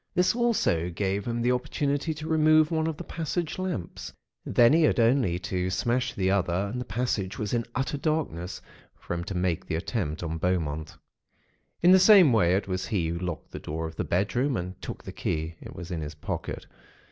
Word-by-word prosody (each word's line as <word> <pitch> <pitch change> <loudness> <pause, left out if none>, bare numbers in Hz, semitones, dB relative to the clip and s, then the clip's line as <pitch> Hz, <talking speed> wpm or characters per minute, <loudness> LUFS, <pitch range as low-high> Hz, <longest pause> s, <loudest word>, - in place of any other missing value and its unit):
This 180 0 +3
also 225 - +1
gave 95 +3 -2
him 120 0 -1
the 125 - +3
opportunity 145 +4 -1
to 155 +1 -6
remove 155 0 +4
one 160 -1 +1
of 160 -2 -3
the - - -6
passage 165 +1 -3
lamps. 180 - -4 0.3
Then 120 +3 +5
he 165 - +5
had 155 - +3
only 115 -6 +3
to 90 0 -2
smash 120 +7 0
the 95 -1 +1
other, 95 0 0
and 125 - -3
the - - -5
passage 105 -4 -2
was 105 0 -3
in 115 -1 0
utter 135 +2 -1
darkness, 140 - -2 0.3
for - - -6
him 85 0 -3
to 95 - -4
make 90 -2 -1
the 80 - -1
attempt 85 - -3
on 80 -1 -3
Beaumont. 80 -4 -1 0.9
"In 175 - +7
the 190 - +8
same 185 - +7
way, 90 -5 +4
it 100 - -1
was 95 -1 -2
he 90 -6 0
who 85 +1 -3
locked 90 -2 -5
the - - -6
door 80 +2 -4
of 80 0 -7
the - - -2
bedroom, 120 +8 0
and 90 +1 -6
took - - -7
the - - -7
key 80 +1 -3
(it - - -10
was 90 +1 -8
in 85 -2 -3
his 75 0 -6
pocket). 75 - -5
100 Hz, 205 wpm, -27 LUFS, 90-145 Hz, 0.9 s, the